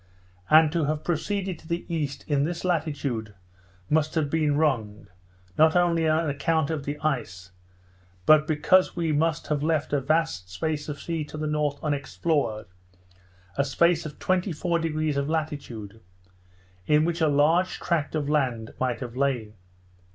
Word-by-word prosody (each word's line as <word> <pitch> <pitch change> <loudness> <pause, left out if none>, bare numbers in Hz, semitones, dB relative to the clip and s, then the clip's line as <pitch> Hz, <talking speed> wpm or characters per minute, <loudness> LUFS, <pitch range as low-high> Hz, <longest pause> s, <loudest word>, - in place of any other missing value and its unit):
And 155 0 +6
to 165 -2 0
have 150 +1 -2
proceeded 185 +2 -2
to - - -16
the 170 +1 -3
east 150 -5 -3
in 145 -2 +2
this 170 +3 -3
latitude, 145 - -2 0.5
must 155 +1 +1
have 150 -3 0
been 150 -3 +1
wrong, 115 -9 0 0.5
not 160 +1 +5
only 170 -2 +3
on 160 +1 +2
account 145 +2 0
of 150 -4 -3
the 145 +1 -3
ice, 100 -12 -3 0.7
but 155 0 +6
because 185 +4 +3
we 170 -2 0
must 155 +1 0
have 150 -2 -1
left 155 -1 0
a 145 - +2
vast 155 - 0
space 150 +11 -3
of 145 -1 -5
sea 165 -2 -3
to 155 - -9
the 155 - -3
north 150 -1 0
unexplored, 145 -5 -1 0.9
a - - +5
space 170 +4 +2
of 150 - -11
24° 165 -4 0
of 140 +1 -1
latitude; 135 -10 -4 0.9
in 150 +1 +4
which 170 0 -1
a 160 - +4
large 155 +5 +2
tract 160 -3 -1
of 150 -2 -1
land 130 -7 0
might 130 -1 -1
have 120 -2 -6
lain. 125 -6 -1
150 Hz, 155 wpm, -26 LUFS, 140-160 Hz, 0.9 s, And